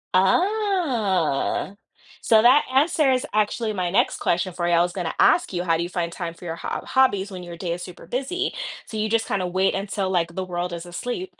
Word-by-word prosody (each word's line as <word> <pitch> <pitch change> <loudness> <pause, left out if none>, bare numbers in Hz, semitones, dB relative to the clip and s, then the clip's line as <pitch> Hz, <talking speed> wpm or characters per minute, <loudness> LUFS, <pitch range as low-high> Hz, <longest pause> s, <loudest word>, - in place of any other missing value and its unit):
Ah, 225 - +1 0.5
so 220 -1 +4
that 255 +5 +6
answers 270 -2 +3
actually 215 +1 0
my 180 -3 -1
next 190 - +2
question 175 +1 0
for 175 -1 -2
you. - - +1
I 170 - +5
was 175 0 -2
going 180 -4 -3
to - - -3
ask - - +4
you, 175 -1 -2
how 165 -2 +2
do 165 - -1
you 175 - -3
find 170 -2 -2
time 170 -2 -5
for 175 - -13
your 165 - -4
hob - - -5
hobbies 205 -7 +2
when 185 - -7
your 175 -1 -9
day 170 -1 -3
is 175 - -6
super 180 - -10
busy? 360 - -2 0.3
So 220 - -9
you 215 0 -1
just 230 0 +1
kind 195 - -1
of 180 -1 -3
wait 190 +1 +2
until, 195 -1 -2
like, 170 -2 0
the 190 - -2
world 175 0 -3
is 170 0 -6
asleep 245 - -5
190 Hz, 225 wpm, -23 LUFS, 175-240 Hz, 0.5 s, that